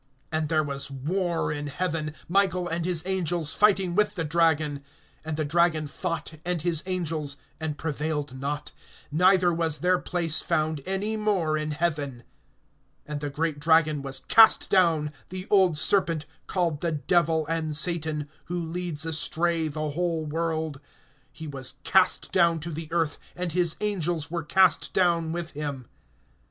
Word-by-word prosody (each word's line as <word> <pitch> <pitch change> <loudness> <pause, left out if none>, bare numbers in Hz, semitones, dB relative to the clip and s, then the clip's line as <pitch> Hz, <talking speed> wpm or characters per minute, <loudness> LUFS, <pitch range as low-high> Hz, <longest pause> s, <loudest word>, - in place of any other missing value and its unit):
(7)And 155 -1 0
there 155 0 +2
was 140 -1 -4
war 165 +6 -1
in 145 -1 -4
heaven, 155 0 -3
Michael 185 -1 +2
and 165 0 -2
his 175 -3 0
angels 175 -4 0
fighting 195 -4 +3
with 210 +3 +2
the 170 - -2
dragon. 155 -3 +1 0.4
And 155 -1 -4
the 155 - 0
dragon 165 0 +2
fought, 165 +1 -4
and 175 -3 -2
his 170 -3 +1
angels, 160 -6 -2 0.2
(8)and 160 -2 -3
prevailed 150 -3 -3
not; 145 +2 -4 0.4
neither 180 +2 +4
was 165 -2 0
their 180 +1 +2
place 165 -3 0
found 155 -1 0
any 205 +3 -1
more 195 -8 +1
in 155 0 -2
heaven. 145 -5 -2 0.8
(9)And 150 -1 -4
the 145 0 -3
great 150 +1 -2
dragon 160 -1 +3
was 135 -1 -5
cast 225 -1 +6
down, 165 -5 +3 0.2
the 185 0 -6
old 190 -6 +4
serpent, 165 -1 +1 0.2
called 170 -5 -1
the 170 -2 0
Devil 160 +1 +1
and 160 -1 -2
Satan, 155 -2 +1 0.2
who 175 +1 -3
leads 165 -2 -2
astray 165 +1 0
the 155 0 -3
whole 165 0 -1
world; 160 -1 -2 0.5
he 160 - -9
was 135 -3 -4
cast 190 -1 +3
down 170 -3 +3
to 170 +2 -4
the 160 0 -6
earth, 165 -3 0 0.2
and 180 -1 -3
his 175 -1 +2
angels 175 -7 -1
were 170 -1 -1
cast 185 +2 +3
down 170 -3 +2
with 170 -1 -4
him. 140 -4 -5
160 Hz, 155 wpm, -26 LUFS, 150-175 Hz, 0.8 s, cast